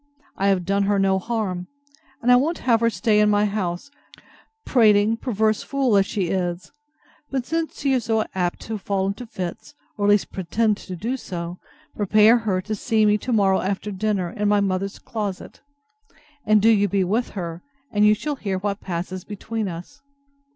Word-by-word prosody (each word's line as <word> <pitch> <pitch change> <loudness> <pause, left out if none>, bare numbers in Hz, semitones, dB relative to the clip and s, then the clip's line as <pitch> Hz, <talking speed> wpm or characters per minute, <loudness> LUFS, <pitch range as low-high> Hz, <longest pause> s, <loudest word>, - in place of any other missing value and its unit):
I 195 - 0
have 190 -3 +2
done 200 +2 +1
her 205 0 +2
no 195 -1 +2
harm. 190 -5 -3 0.6
And 250 - +4
I - - +8
won't 300 +7 +2
have 235 -3 +4
her 230 0 +3
stay 220 -2 +1
in 210 0 +4
my 205 0 +3
house; 200 +4 -3 0.7
prating, 215 -3 +4
perverse 220 -3 0
fool, 270 -5 +1
as 195 -1 +4
she 190 -5 -2
is! 180 -1 -2 0.6
But 265 -3 -2
since 325 +2 -3
she 275 -1 +1
is 250 -4 0
so 220 -1 +1
apt 180 -2 -1
to 220 -1 -5
fall 195 0 -1
into 205 +5 -4
fits, 185 +5 -6 0.2
or 205 - +2
at - - +4
least 205 -1 +3
pretend 210 +4 0
to 185 - -8
do 235 +9 -3
so, 175 -5 -6 0.4
prepare 215 +3 +5
her 200 -5 -1
to 215 +3 -4
see 220 +1 +1
me 210 0 +3
to 250 - -4
morrow 195 -4 +3
after 200 +2 -3
dinner, 195 -3 -1
in 210 -3 -1
my 205 0 +4
mother's 195 0 -1
closet, 205 -4 -5 0.9
and 215 -1 +4
do 225 - +6
you 205 -2 +3
be 195 0 +1
with 220 +7 0
her, 170 -2 -5 0.3
and 205 0 +2
you 210 0 +6
shall 295 +6 -4
hear 195 -6 -2
what 200 +1 -3
passes 180 +1 -4
between 215 +1 -4
us. 170 -1 -8
205 Hz, 190 wpm, -23 LUFS, 190-225 Hz, 0.9 s, I